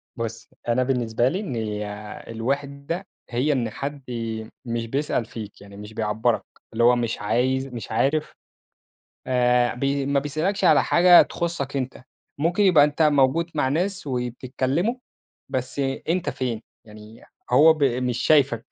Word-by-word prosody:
بُصّ، 115 -1 -5 0.2
أنا 120 +2 +2
بالنسبة 120 -2 +1
لي 185 +6 -2
إن 110 - -3
آآ، 105 +1 -8
الوحدة 140 - -3 0.2
هي 125 +5 +1
إن 120 -4 -1
حد 140 +2 -6
ي 110 -2 -4 0.2
مش 115 -1 -2
بيسأل 135 -2 -1
فيك، 105 -3 -9
يعني 100 0 -13
مش 105 +1 -10
بيعبّرك، 110 +2 0 0.3
اللي 115 - +1
هو 120 +1 +6
مش 120 -2 -2
عايز 130 +5 +1
مش 120 -4 -8
عارف 140 +7 0 0.9
آآ، 125 -1 +2
ب 125 - -4
ما 140 0 +1
بيسألكش 160 +8 -1
على - - +6
حاجة 175 0 +7
تخُصّك 155 -5 -3
أنت، 130 -1 -4 0.4
ممكن 170 +7 +1
يبقى 170 -7 +6
أنت 150 +2 0
موجود 150 +3 +3
مع 130 -3 +1
ناس، 185 +4 -1
وبتتكلّموا 130 - -1 0.5
بس 130 +2 -4 0.3
أنت 175 +1 0
فين، 120 -4 -3 0.2
يعني 105 +1 -14 0.3
هو 150 +6 +7
ب 155 -3 0
مش 125 -1 0
شايفك، 130 -4 +3
130 Hz, 150 wpm, -24 LUFS, 115-145 Hz, 0.9 s, حاجة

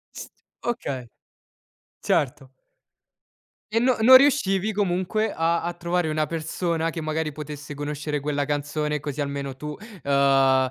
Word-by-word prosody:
S - - -8 0.3
okay, 140 - -3 0.9
certo. 135 -1 -1 1.2
E 225 - +2
no 250 +1 +2
non 245 +4 +9
riuscivi 220 -8 +4
comunque 200 +2 0
a 165 +1 +1
a 175 +1 -3
trovare 175 0 -1
una 155 0 0
persona 165 +1 -2
che, 165 0 -5
magari, 155 0 -2
potesse 150 0 -7
conoscere 150 0 -3
quella 145 0 -1
canzone 150 +1 -2
così 145 0 -5
almeno 140 -2 -3
tu, 150 +2 -6 0.3
uhm, 135 -1 +4
155 Hz, 130 wpm, -24 LUFS, 145-175 Hz, 1.2 s, non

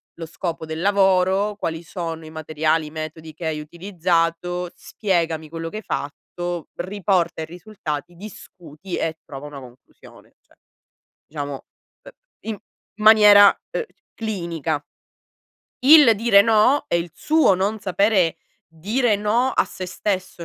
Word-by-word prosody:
lo 165 - -7
scopo 165 0 -5
del 160 +1 -5
lavoro? 195 +1 +2
Quali 165 -5 -4
sono 165 -1 -6
i - - -10
materiali, 155 0 -1
i - - -11
metodi 155 0 -7
che 160 +2 -8
hai 155 -1 -2
utilizzato? 175 +1 -1
Spiegami 165 -6 -2
quello 165 +1 -6
che 215 - -7
hai - - -6
fatto? 175 +3 -5
Riporta 185 -2 -1
i - - -3
risultati, 175 -2 -7
discuti 180 -3 -9
e 160 0 -2
trova 135 +1 -9
una 145 -2 -9
conclusione." 125 0 -17
Cioè, - - -29 0.7
diciamo, 145 -2 -5 0.5
uhm, - - -12 0.4
in 215 - -3 0.4
maniera, 210 -2 +8 0.2
uhm, - - -2 0.3
clinica. 170 -9 -3 1.0
Il 285 -3 +8
dire 215 -1 +5
"no" 225 +6 +3
e 170 - +1
il 170 0 -5
suo 310 -10 +3
non 200 +4 -1
sapere 195 -2 +2 0.3
dire 210 +8 0
"no" 220 +5 +1
a - - +2
se 185 - -8
stesso, 185 -1 -3
175 Hz, 135 wpm, -22 LUFS, 160-205 Hz, 1.0 s, maniera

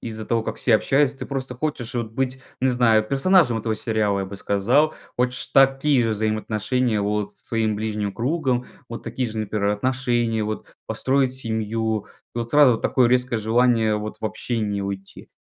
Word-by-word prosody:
из-за 110 -1 -5
того 115 0 0
как - - -4
все 115 -4 +4
общаются. 135 +2 +1
Ты - - -6
просто 130 -2 -4
хочешь 130 -5 -3
вот 115 -2 -3
быть, 130 +1 -2 0.2
не 130 - +2
знаю, 120 -3 +4
персонажем 135 - +3
этого 110 0 -1
сериала, 105 -3 0
я - - -2
бы 100 +1 -8
сказал. 120 +12 +2 0.2
Хочешь 125 0 0
такие 135 0 +4
же 115 - +1
взаимоотношения 110 +2 0
вот 105 0 -1
со - - -21
своим 110 -2 0
ближним 105 -1 -2
кругом, 130 -1 0 0.2
вот 115 - -7
такие 125 -2 -3
же 110 0 -6
например 105 -1 -1
отношения, 120 -1 0
вот 110 0 -5
построить 130 -1 +1
семью. 110 -3 -2 0.3
Вот 115 0 -4
сразу 140 -6 +6
такое 125 0 +2
резкое 125 -1 +1
желание 110 -1 +2
вот 105 0 -5
в - - -6
общение 105 -3 -2
уйти. 95 0 -7
115 Hz, 170 wpm, -23 LUFS, 110-130 Hz, 0.3 s, сразу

